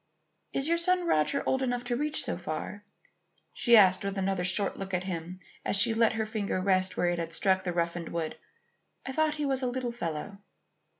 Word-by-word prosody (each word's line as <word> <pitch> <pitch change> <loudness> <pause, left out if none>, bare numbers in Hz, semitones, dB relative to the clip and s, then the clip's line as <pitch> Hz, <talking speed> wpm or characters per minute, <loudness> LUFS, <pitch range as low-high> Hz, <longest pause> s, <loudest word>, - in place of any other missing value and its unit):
"Is 275 +2 -1
your 335 +1 +2
son 365 +1 +2
Roger 215 - +1
old 265 - +1
enough 245 -2 -1
to 245 0 -2
reach 300 +4 -1
so - - -2
far?" 205 0 -6 0.7
she 240 -2 +5
asked 190 -2 +5
with 200 0 -3
another 190 -1 -1
short 195 +2 +3
look 195 -1 -4
at 180 - -2
him 180 -1 -5 0.2
as - - +2
she 225 +3 +5
let 225 0 +3
her 220 0 -1
finger 215 -3 -2
rest 185 0 +1
where 175 - +2
it 175 0 -1
had 165 0 -4
struck 190 +1 +1
the 180 - -2
roughened 170 -1 -2
wood. 165 -2 -3 0.7
"I 265 - -4
thought 310 +2 +1
he 300 -1 -2
was 270 -1 0
a 255 - 0
little 245 -1 -3
fellow." 195 -2 -5
200 Hz, 205 wpm, -29 LUFS, 185-255 Hz, 0.7 s, she